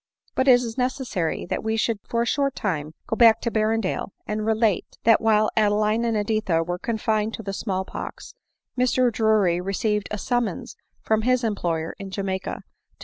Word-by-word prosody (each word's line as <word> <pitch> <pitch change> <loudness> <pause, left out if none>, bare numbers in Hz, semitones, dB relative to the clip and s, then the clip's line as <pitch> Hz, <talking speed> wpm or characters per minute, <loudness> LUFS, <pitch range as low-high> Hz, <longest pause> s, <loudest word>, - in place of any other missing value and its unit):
But 260 - 0
it 260 - +9
is 245 0 -2
necessary 250 - -1
that - - -3
we 220 0 0
should 220 -1 0
for 235 0 +1
a - - -2
short 275 +2 0
time 155 -6 -3
go - - -2
back 225 -1 +6
to 235 - -1
Berrendale, 215 -3 0
and 215 0 -3
relate, 220 -2 +1
that 225 -1 +5
while 215 -1 +3
Adeline 215 +2 +2
and 230 -2 +1
Editha 210 -5 +1
were 175 +1 -4
confined 220 0 -1
with 225 - -9
the 195 - -3
small 190 -2 -2
pox, - - -8 0.4
Mr 250 0 +2
Drury 215 -6 +2
re 195 +2 -3
ceived 210 -1 0
a 210 - -3
summons 235 -2 -2 0.3
from 220 0 +2
his 255 +2 +2
employer 170 -7 -1
in 195 -1 -6
Jamaica 190 -1 -3
to - - -7
go - - -35
215 Hz, 190 wpm, -24 LUFS, 195-230 Hz, 0.4 s, it